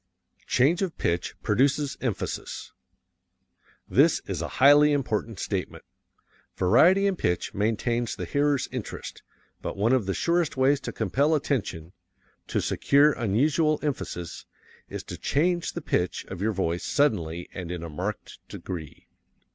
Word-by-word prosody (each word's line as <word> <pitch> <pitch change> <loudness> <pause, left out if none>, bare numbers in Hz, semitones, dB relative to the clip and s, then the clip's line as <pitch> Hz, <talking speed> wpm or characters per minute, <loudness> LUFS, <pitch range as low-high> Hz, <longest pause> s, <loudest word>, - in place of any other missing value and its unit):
Change 145 +9 +3
of 185 -4 -2
Pitch 85 0 -1
Produces 140 +2 +1
Emphasis 120 -6 -4 1.2
This - - +4
is - - -4
a - - -2
highly 145 +2 +7
important 115 -6 -1
statement. 95 -3 -4 0.7
Variety 165 - +5
in 200 -1 +2
pitch 90 - -1
maintains 115 +3 0
the 90 - -5
hearer's 145 - +1
interest, - - -6 0.4
but - - -5
one 110 +5 +2
of 120 -7 +1
the 95 - -1
surest 170 -4 0
ways 135 +2 +3
to - - -5
compel 140 - +1
attention 95 - -2 0.5
to - - 0
secure 145 +2 +4
unusual 145 +8 +1
emphasis 95 - -4 0.4
is - - -6
to - - -8
change 175 +4 0
the - - -5
pitch 90 - -1
of 95 -2 -6
your 110 +2 +1
voice 85 -4 -1
suddenly 90 - 0
and 90 -3 -6
in 90 -1 -5
a - - -5
marked 90 +7 -5
degree. 80 -5 -7
120 Hz, 140 wpm, -26 LUFS, 95-145 Hz, 1.2 s, highly